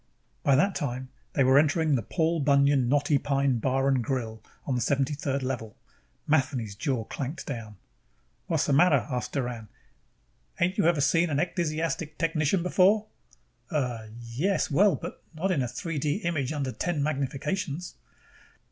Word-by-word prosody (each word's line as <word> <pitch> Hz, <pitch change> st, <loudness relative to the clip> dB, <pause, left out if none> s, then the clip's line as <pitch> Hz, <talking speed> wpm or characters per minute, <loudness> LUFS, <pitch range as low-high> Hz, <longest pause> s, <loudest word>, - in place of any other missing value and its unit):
By 140 Hz, -, +4 dB
that 195 Hz, +8 st, +3 dB
time, 130 Hz, -3 st, -3 dB, 0.2 s
they 135 Hz, -, +3 dB
were 130 Hz, +2 st, +6 dB
entering 155 Hz, +1 st, +2 dB
the 125 Hz, -, +2 dB
Paul 165 Hz, -, 0 dB
Bunyan 140 Hz, -3 st, +3 dB
Knotty 145 Hz, +1 st, +3 dB
Pine 135 Hz, -3 st, +1 dB
Bar 135 Hz, +3 st, +1 dB
& 135 Hz, -, +3 dB
Grill, 115 Hz, -3 st, -3 dB, 0.2 s
on 135 Hz, -, -1 dB
the 125 Hz, -, 0 dB
73rd 140 Hz, 0 st, 0 dB
Level. 120 Hz, -5 st, -4 dB, 0.5 s
Matheny's 130 Hz, -8 st, 0 dB
jaw 125 Hz, +1 st, -1 dB
clanked 140 Hz, +7 st, -5 dB
down. 115 Hz, -6 st, -6 dB, 0.7 s
"Whassa 145 Hz, -, +1 dB
matter?" 145 Hz, -3 st, +4 dB
asked 125 Hz, -1 st, -3 dB
Doran. 120 Hz, -5 st, -3 dB, 0.9 s
"Ain't 185 Hz, +4 st, +1 dB
you 195 Hz, -, +4 dB
ever 170 Hz, -4 st, +3 dB
seen 165 Hz, +4 st, +3 dB
a 145 Hz, -, -1 dB
ecdysiastic 165 Hz, -1 st, -1 dB
technician 165 Hz, +1 st, +1 dB
before?" 195 Hz, +4 st, +4 dB, 0.6 s
"Uh, 125 Hz, -, -2 dB
yes, 130 Hz, +12 st, -1 dB
but 140 Hz, -, -3 dB, 0.3 s
well, -, -, -4 dB, 0.2 s
not 185 Hz, +5 st, 0 dB
in 160 Hz, -7 st, +1 dB
a 125 Hz, -, 0 dB
3 150 Hz, +6 st, -4 dB
D 145 Hz, +1 st, 0 dB
image 155 Hz, -6 st, -1 dB
under 140 Hz, -4 st, -2 dB
ten 160 Hz, +1 st, -1 dB
magnifications." 150 Hz, +4 st, -2 dB
140 Hz, 150 wpm, -27 LUFS, 130-165 Hz, 0.9 s, were